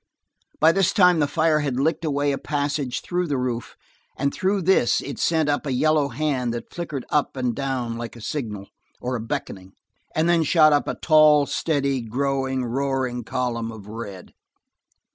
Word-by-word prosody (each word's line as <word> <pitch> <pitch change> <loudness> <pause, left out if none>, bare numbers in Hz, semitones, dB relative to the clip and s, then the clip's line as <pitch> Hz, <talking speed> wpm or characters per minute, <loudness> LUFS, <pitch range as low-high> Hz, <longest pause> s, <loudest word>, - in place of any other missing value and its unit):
By 160 +1 +6
this 190 0 +2
time 180 -5 +5
the 145 - +2
fire 155 +1 +2
had 140 -4 -1
licked 160 +4 0
away 145 -2 0
a 135 - -2
passage 145 -3 -2
through 180 0 -2
the 145 -3 -1
roof 125 -2 -3 0.4
and 140 +1 0
through 190 +1 0
this 180 -9 +3
it 140 - -7
sent 160 -2 +2
up 145 0 0
a - - -1
yellow 155 +2 +2
hand 130 -3 -1
that 120 - -8
flicked 155 -7 -5
up 145 -2 0
and 125 -2 0
down 125 -3 -3
like 120 0 -6
a 120 - -11
signal, 105 -6 -5 0.3
or 125 +1 -3
a - - -2
beckoning, 95 -4 -5 0.4
and 160 +1 +2
then 170 -1 +4
shot 155 -1 +5
up 145 - +1
a - - -2
tall, 155 -2 +5
steady, 140 -4 -1
growing, 130 +2 -1
roaring 130 -1 -2
column 115 -1 -2
of 110 -3 -11
red. 105 -3 -8
140 Hz, 180 wpm, -23 LUFS, 125-155 Hz, 0.4 s, By